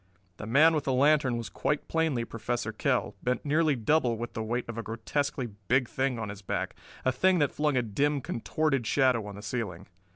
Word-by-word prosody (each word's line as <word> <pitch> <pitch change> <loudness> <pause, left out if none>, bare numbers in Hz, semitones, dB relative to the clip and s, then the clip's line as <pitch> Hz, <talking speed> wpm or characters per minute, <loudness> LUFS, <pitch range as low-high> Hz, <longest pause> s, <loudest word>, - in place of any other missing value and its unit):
The 110 - -7
man 150 +8 +6
with 150 -3 -1
the 135 - +1
lantern 140 -2 +3
was 115 -1 -4
quite 150 - -2
plainly 160 -8 0
Professor 115 0 -3
Kell, 110 - 0
bent 125 +3 -1
nearly 155 0 +3
double 120 0 +2
with 120 +1 -5
the 110 - -3
weight 120 +3 -2
of 115 - -5
a - - -1
grotesquely 120 +5 -2 0.2
big 125 0 +3
thing 130 -1 -1
on 110 -2 -4
his 100 0 -8
back, 100 - -3 0.3
a 130 - +4
thing 185 +8 +3
that 145 -4 +2
flung 150 -3 +1
a 125 - +2
dim, 140 +7 0
contorted 135 0 -1
shadow 125 -6 +2
on 100 - -7
the 100 - -10
ceiling. 105 -7 -4
125 Hz, 205 wpm, -29 LUFS, 115-145 Hz, 0.3 s, man